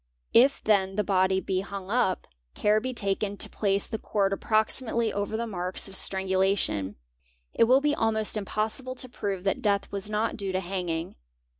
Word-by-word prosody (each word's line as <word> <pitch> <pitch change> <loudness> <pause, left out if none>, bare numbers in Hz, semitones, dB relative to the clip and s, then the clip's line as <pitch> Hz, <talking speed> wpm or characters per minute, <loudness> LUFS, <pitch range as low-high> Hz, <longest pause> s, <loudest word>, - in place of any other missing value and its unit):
If 265 +4 +5
then 195 -3 +2
the 210 - +1
body 190 -1 +2
be 190 0 -1
hung 195 0 -6
up, 220 -6 +1 0.3
care 210 +1 +3
being 255 +1 -4
taken 200 -1 -1
to - - -3
place 200 -1 +2
the 220 - -4
cord 195 -2 0
approximately 220 +2 0
over 205 +2 -2
the 235 - -2
marks 185 -4 -2
of 195 - -7
strangulation, 190 - 0 0.6
it - - +4
will 255 +4 +5
be 295 0 +2
almost 220 -5 0
impossible 220 +5 -2
to 255 - -7
prove 200 -6 -4
that 195 - 0
death 200 -2 +1
was 200 +1 -4
not 215 +2 -1
due 195 -3 -3
to 185 - +1
hanging. 175 - -3
200 Hz, 175 wpm, -27 LUFS, 190-220 Hz, 0.6 s, If